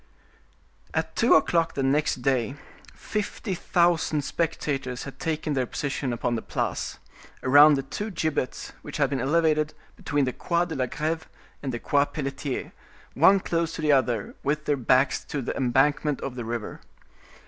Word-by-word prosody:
At - - -1
two - - +5
o'clock 165 -1 +2
the 135 - -1
next 135 -1 +1
day 130 -1 +1 0.4
fifty 210 -1 -3
thousand 170 -4 +2
spectators 140 -6 -2
had 140 - -9
taken 155 -1 -2
their 130 -3 0
position 140 -1 -2
upon 120 0 -1
the 115 - -1
Place, - - -3 0.5
around 145 +3 +7
the 135 - -2
two 205 +11 -5
gibbets 155 - -2
which 145 - -7
had 140 -2 +2
been 135 -3 -1
elevated 155 +1 +2 0.2
between 145 -3 0
the 125 - -2
Quai 170 +5 0
de 170 - -6
la 130 -3 -1
Greve 160 +4 -2 0.3
and 135 - -3
the 120 - -3
Quai 140 +4 +2
Pelletier; 140 -2 -4 0.4
one 195 0 +6
close 165 -2 -1
to 160 - -5
the 150 - +4
other, 125 -6 +1
with 150 +2 -1
their 145 - +2
backs 130 +1 +2
to 145 - -4
the 130 - -3
embankment 140 +3 +2
of 135 - -4
the 120 -2 -5
river. 115 -1 -5
145 Hz, 165 wpm, -26 LUFS, 130-160 Hz, 0.5 s, around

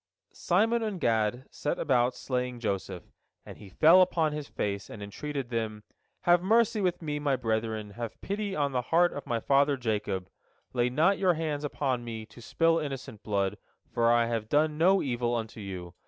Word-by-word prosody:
" - - -58 0.2
Simon 225 +6 +3
and 210 -4 -3
Gad 115 +1 +1
set 150 - -2
about 125 -4 +2
slaying 125 -1 -3
Joseph, 95 -5 -3 0.4
and - - -11
he 100 - -12
fell 165 - +6
upon 165 -4 +2
his 150 -1 -5
face, 100 -1 -3
and 110 - -9
entreated 135 +5 -5
them: 110 -2 -3 0.4
"Have 175 0 +4
mercy 220 +2 +3
with 180 -2 -1
me, 150 -1 -2
my 145 -2 +1
brethren, 110 -3 -2
have 115 +1 -6
pity 200 0 -3
on 145 -2 0
the 125 -1 0
heart 170 +7 +3
of 145 - -7
my 115 -1 0
father 140 +3 +3
Jacob. 105 -6 -2 0.5
Lay 120 -1 +2
not 165 +10 +2
your 185 -3 +3
hands 155 -2 -2
upon 135 -4 -1
me, 115 -2 -6
to 120 - -15
spill 165 +7 +2
innocent 135 -6 -6
blood, 100 -2 -1 0.3
for 115 0 +3
I 120 0 +4
have 115 -2 -3
done 150 +1 +2
no 185 +5 +4
evil 120 -2 -1
unto 110 -1 -5
you. 90 -4 -7
130 Hz, 185 wpm, -29 LUFS, 110-160 Hz, 0.5 s, fell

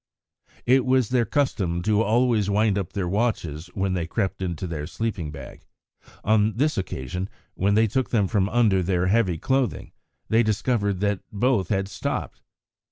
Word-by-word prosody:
It 130 +1 +4
was 130 -3 +2
their 125 -2 +2
custom 95 - 0
to 105 +2 +2
always 115 -2 +2
wind 105 0 +2
up 100 -4 -3
their 95 -3 -2
watches 85 -6 -1
when 95 -1 0
they 85 -3 -2
crept 95 +1 -2
into 90 -2 -3
their 75 -4 -4
sleeping 100 -5 -3
bag; 70 -4 -10 0.6
on 110 0 +3
this 150 +4 +2
occasion 90 +1 -4 0.2
when 100 +2 +1
they 110 +1 +5
took 130 +4 -1
them 105 -5 +2
from 100 -1 +1
under 110 -5 +3
their 90 0 0
heavy 95 -3 +2
clothing 130 - -1 0.4
they 115 +1 +4
discovered 105 -3 0
that 100 -2 +1
both 105 -3 +1
had 95 -2 0
stopped. - - -4
100 Hz, 165 wpm, -24 LUFS, 90-115 Hz, 0.6 s, they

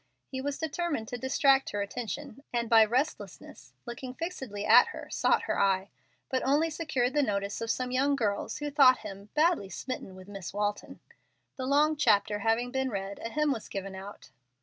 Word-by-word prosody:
He 260 - -5
was 280 +1 -3
determined 320 -6 -2
to 245 - -4
distract 270 +1 +3
her 205 - -2
attention, 250 +5 -6
and 235 -1 -1
by 225 -1 +8
restlessness, 255 +8 -3
by 240 - -5
looking 250 +1 -7
fixedly 265 - -5
at - - +7
her, - - -8
sought - - +2
her - - -1
eye, 195 0 +1 0.4
but 260 -1 -1
only 300 +5 +2
secured 270 -6 -1
the 295 - +3
notice 200 -5 -2
of 230 - -3
some 250 +2 -1
young 275 +3 +2
girls 205 -6 -1
who 295 0 -4
thought 270 -3 +6
him 200 0 -8
"badly 310 - +2
smitten 195 -1 -6
with 185 0 -12
Miss 195 -3 -7
Walton." 205 0 -3 0.5
The 260 -1 -4
long 300 +3 +3
chapter 210 -6 +2
having 225 +3 +1
been 265 0 -1
read, 200 -2 -5
a 230 - -3
hymn 300 +2 +1
was 230 -5 -4
given 195 0 -5
out. 195 +2 -10
250 Hz, 190 wpm, -29 LUFS, 205-280 Hz, 0.5 s, by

